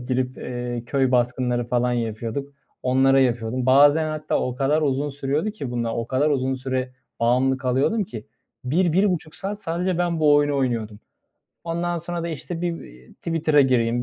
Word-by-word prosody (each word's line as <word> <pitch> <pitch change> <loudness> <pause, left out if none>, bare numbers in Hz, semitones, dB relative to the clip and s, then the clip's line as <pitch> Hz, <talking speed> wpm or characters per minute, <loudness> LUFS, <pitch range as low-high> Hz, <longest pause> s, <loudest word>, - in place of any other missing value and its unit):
girip, 130 0 -1
eee, 120 -1 -4
köy 135 0 +1
baskınları 125 0 +1
falan 125 0 +1
yapıyorduk, 115 +4 -3 0.3
onlara 135 +1 +4
yapıyordum. 120 0 0
Bazen 145 +4 +5
hatta 155 0 -1
o 125 - -2
kadar 145 +4 +1
uzun 140 0 0
sürüyordu 145 +8 -1
ki 145 - -6
bunlar, 115 -2 -2
o 115 0 -3
kadar 140 +4 +1
uzun 130 -1 0
süre 130 -1 -3 0.3
bağımlı 130 +3 +2
kalıyordum 135 - +1
ki, 115 - -9 0.4
1-1,5 175 +3 +1
saat 200 +2 -5
sadece 175 +1 -1
ben 170 -2 0
bu 150 -1 +5
oyunu 145 -1 +3
oynuyordum. 115 -5 -2 0.6
Ondan 170 +1 -2
sonra 170 +1 -4
da, 170 - -3
işte, 165 +2 -5
"Bir, 170 -1 -2
eee, 60 +1 -15
Twitter'a 155 -3 +1
gireyim 120 -2 +2
135 Hz, 165 wpm, -23 LUFS, 125-160 Hz, 0.6 s, Bazen